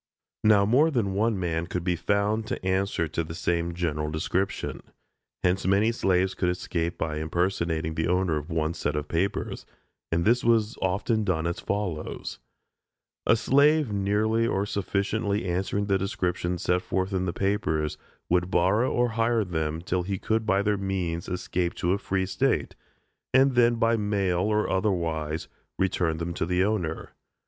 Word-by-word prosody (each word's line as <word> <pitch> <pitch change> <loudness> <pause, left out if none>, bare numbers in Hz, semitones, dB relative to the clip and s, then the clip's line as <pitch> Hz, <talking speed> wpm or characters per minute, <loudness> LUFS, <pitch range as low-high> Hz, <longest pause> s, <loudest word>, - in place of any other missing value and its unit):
Now 105 -2 +5
more 135 +10 +4
than 115 -10 0
one 105 +1 +1
man 85 -1 -1
could 90 -1 -3
be 90 -1 +1
found 105 +5 0
to - - -4
answer 95 -2 0
the 80 +1 -4
same 85 0 -1
general 75 -3 -1
description. 85 +5 -2 0.6
Hence 90 +1 +1
many 100 +4 +3
slaves 95 -4 +1
could 90 - 0
escape 85 -1 -2
by 75 -1 -2
impersonating 80 -1 -1
the 80 0 -1
owner 90 -2 +1
of 75 +2 -6
one 80 -1 0
set 75 -3 -2
of 75 0 -2
papers; 95 +6 -2 0.5
and 85 +1 +1
this 120 +3 +3
was 115 -1 +2
often 100 +4 +1
done 85 -5 0
as 85 0 -2
follows: 95 -6 -3 0.9
A - - +6
slave 140 +1 +3
nearly 105 +3 +1
or 100 -2 0
sufficiently 100 0 -1
answering 95 +3 -1
the 100 -1 +1
description 90 -2 -1
set 90 +1 +1
forth 95 +2 -2
in 95 -1 0
the 90 - -1
papers, 85 -6 -1 0.3
would 90 +1 +1
borrow 95 +8 +2
or 120 0 +2
hire 115 -1 +1
them 80 -2 -2
till 90 0 0
he 95 +2 -3
could 110 +3 -1
by 100 0 +3
their 105 -1 +1
means 95 -4 -2
escape 90 -1 -2
to 90 +1 +1
a 100 - -1
free 95 -1 -1
state, 95 0 0 0.6
and 135 0 +5
then, 120 -1 +4
by 115 0 +2
mail 100 -4 0
or 105 +3 +1
otherwise, 85 -5 -1 0.3
return 90 -4 0
them 85 +1 -3
to 85 - -2
the 90 +1 +2
owner. 95 -6 -2
95 Hz, 165 wpm, -26 LUFS, 85-105 Hz, 0.9 s, A